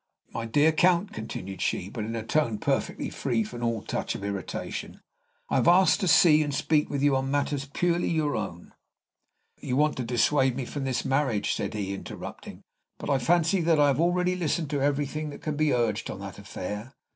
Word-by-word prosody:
My 115 0 -3
dear 145 +7 +4
Count," 175 +4 +2
continued 95 -3 -6
she, 90 - -1
but 110 +1 -5
in 115 +1 -4
a 115 - -3
tone 120 -5 +1
perfectly - - -1
free 120 -5 0
from 120 +3 -7
all 115 -2 -1
touch - - -3
of - - -7
irritation, 100 -2 -5 0.5
"I - - +1
have - - +2
asked 185 +3 +5
to 190 - 0
see 155 -1 +6
and 145 -1 -1
speak 150 +2 +1
with 140 -1 -2
you 145 -2 +4
on 135 0 -1
matters 140 -1 -1
purely 175 +2 +1
your 155 -3 0
own 95 -5 -5 0.4
" - - -50
"You 125 - -2
want 150 +1 +2
to 130 - -2
dissuade 130 +2 +2
me 130 -1 -3
from 140 +2 -4
this 130 -2 -1
marriage," 135 -6 +1
said - - -3
he, 100 -2 -2
interrupting; 95 - -8 0.3
"but - - -3
I 135 - +3
fancy 170 +7 +2
that 165 -2 +3
I 145 -1 +5
have 140 +3 +1
already 180 +1 +2
listened 160 -3 -1
to 145 -2 0
everything 145 +2 -1
that 145 - -10
can 155 -1 -2
be 155 0 +2
urged 115 -3 0
on - - -5
that - - -8
affair. 105 +7 -6
140 Hz, 205 wpm, -27 LUFS, 115-155 Hz, 0.5 s, see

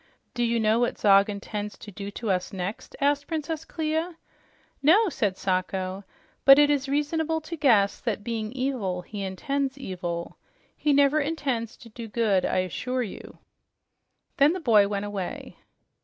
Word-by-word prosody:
"Do 240 - -1
you 235 0 +1
know 220 +1 +3
what 240 - 0
Zog 200 0 +5
intends 205 0 -5
to 210 - -11
do 200 +1 -6
to 210 +1 -3
us 180 -1 -1
next?" 190 +2 -5
asked 285 0 +1
Princess 320 0 -3
Clia. 320 +2 -2 0.6
"No," 375 +9 +5
said 205 - -1
Sacho, 185 +1 -2 0.4
"but 275 0 +9
it 295 0 +5
is 280 -1 0
reasonable 320 +3 0
to 320 +2 -6
guess 230 -10 +3
that, 215 -4 -3
being 220 -2 -3
evil, 245 -9 -2
he 205 +2 -7
intends 270 +9 -2
evil. 175 -8 -5 0.4
He 300 - +1
never 285 +1 +4
intends 275 -7 -2
to 240 - -14
do 230 +1 -8
good, 210 -4 +1
I 185 - +1
assure 250 +8 -2
you." 205 - -9 1.0
Then 290 +3 +5
the 370 - -3
boy 220 - +5
went 200 0 -2
away. 200 -3 -5
235 Hz, 160 wpm, -26 LUFS, 200-285 Hz, 1.0 s, but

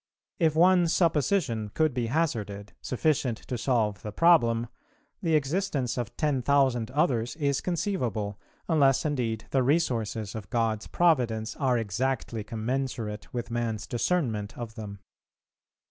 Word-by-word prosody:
If 160 -3 +3
one 180 +1 +5
supposition 160 - +1
could 155 -3 +2
be 120 -2 -1
hazarded, 105 -8 -2
sufficient 130 -3 0
to 125 - -2
solve 115 -4 0
the 105 - -6
problem, 120 -6 +4 0.6
the 165 -2 +2
existence 145 -4 0
of 120 -4 -4
ten 145 -4 +1
thousand 130 -3 +2
others 125 -4 0
is 140 -3 0
conceivable, 120 - -2 0.3
unless 140 -5 +3
indeed 120 -7 -1
the 135 - +3
resources 120 - 0
of 110 -3 -7
God's 115 -2 0
Providence 120 -10 +1
are 130 -4 +1
exactly 115 +1 -2
commensurate 115 -1 -3
with 120 -1 -4
man's 115 -3 -2
discernment 120 - -1
of 115 -2 -6
them. 105 -3 -7
125 Hz, 130 wpm, -28 LUFS, 110-150 Hz, 0.6 s, one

